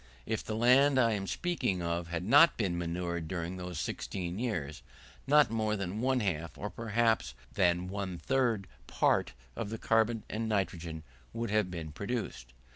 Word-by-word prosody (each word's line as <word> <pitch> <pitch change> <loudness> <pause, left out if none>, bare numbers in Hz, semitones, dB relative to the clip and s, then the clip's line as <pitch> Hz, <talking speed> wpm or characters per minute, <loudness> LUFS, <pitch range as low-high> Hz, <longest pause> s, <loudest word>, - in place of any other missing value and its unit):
If 110 0 -2
the 110 - -4
land 130 +4 +5
I 115 -3 +4
am 100 -2 -2
speaking 125 - -1
of 85 0 -2
had 85 0 -3
not 145 - +6
been 95 -6 0
manured 85 -1 -3
during 90 +1 -4
those 90 -3 -5
16 90 +3 -4
years, 85 - -3 0.5
not 150 -1 +5
more 110 -1 0
than 100 +1 -3
one 130 0 +2
half, 85 -5 -2
or 105 - -5
perhaps 115 - 0 0.2
than 90 -2 +2
one 95 -2 -4
third 120 -4 +1 0.2
part - - +2 0.2
of 110 - -4
the 115 - -4
carbon 115 0 +2
and 110 +1 -3
nitrogen 85 -6 -2 0.3
would 115 -2 -3
have 105 -3 +2
been 85 -3 -6
produced. 100 - -4
100 Hz, 165 wpm, -31 LUFS, 85-115 Hz, 0.5 s, not